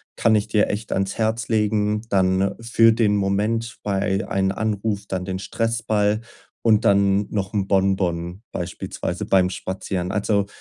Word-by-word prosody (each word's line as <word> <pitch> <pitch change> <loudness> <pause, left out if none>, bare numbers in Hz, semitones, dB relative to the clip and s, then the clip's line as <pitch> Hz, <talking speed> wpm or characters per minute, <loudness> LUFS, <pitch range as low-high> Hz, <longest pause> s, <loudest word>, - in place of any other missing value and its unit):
kann 110 -1 +3
ich 105 - +1
dir 105 - +2
echt 105 +1 -4
ans 95 0 -1
Herz 110 0 0
legen, 105 -1 +1
dann 95 0 +2
für 115 0 +4
den 110 -2 +2
Moment 105 +4 -1
bei 100 0 0
einen 95 0 +1
Anruf 105 -1 -2
dann 95 -2 -3
den 95 0 -3
Stressball, 110 -1 0 0.4
und 110 -2 +4
dann 100 0 +3
noch 100 -2 -3
'n 100 -2 0
Bonbon 95 -2 0
beispielsweise 90 0 -4
beim 90 -1 +3
Spazieren. 95 -1 -4
Also, 100 -1 +1
100 Hz, 145 wpm, -22 LUFS, 95-110 Hz, 0.4 s, für